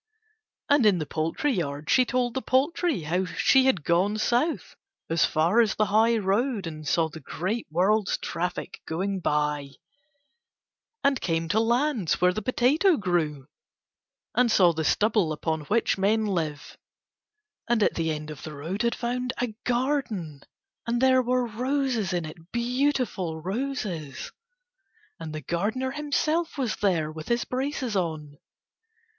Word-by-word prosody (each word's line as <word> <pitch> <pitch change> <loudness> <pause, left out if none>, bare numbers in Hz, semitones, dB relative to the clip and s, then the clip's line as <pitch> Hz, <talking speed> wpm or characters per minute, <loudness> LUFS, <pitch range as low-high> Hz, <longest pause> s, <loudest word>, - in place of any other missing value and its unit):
And 285 -3 +4
in 200 -3 +4
the 155 - -2
poultry 165 - -1
yard 145 -6 -3
she 255 - +5
told 245 -1 0
the 265 - -2
poultry 285 - +1
how 175 +5 0
she 260 +8 +3
had 190 - +2
gone 185 +6 +2
South 245 +9 0 0.4
as 165 -1 +4
far 170 +9 +3
as 215 -2 +1
the 215 - +2
high 225 +2 +4
road, 210 +2 0
and 155 -2 -7
saw 165 +3 +2
the 160 +1 -10
great 185 - -3
world's 190 +5 +2
traffic 180 +1 -4
going 190 +4 -2
by, 150 -3 -1 1.3
and 275 -3 +2
came 165 -1 -1
to 215 - +2
lands 235 - +1
where 180 0 +4
the 215 - -3
potato 285 - +3
grew, 160 -8 -1 0.9
and 245 -2 +3
saw 180 -5 +5
the 160 0 -2
stubble 205 +2 +2
upon 155 0 -2
which 215 0 +1
men 215 +3 +2
live, 160 -7 -3 0.9
and 235 -3 +3
at - - +2
the 165 -1 -1
end 155 0 -4
of 150 - -9
the 155 -1 -7
road 165 +8 -4
had 235 0 +1
found 250 +1 -2
a 245 -3 -1
garden, 240 - -1 0.5
and 235 +1 0
there 260 0 +5
were 250 0 +1
roses 250 -2 -1
in 175 -2 -1
it 165 +2 -12
beautiful 240 - -1
roses! 190 - -4 0.9
and 160 -1 -6
the 155 0 -5
gardener 215 - -1
himself 305 +3 -1
was 250 -5 -1
there 170 -7 +1
with 155 0 -9
his 235 0 0
braces 260 -3 -2
on. 155 -5 -3
205 Hz, 150 wpm, -26 LUFS, 165-250 Hz, 1.3 s, she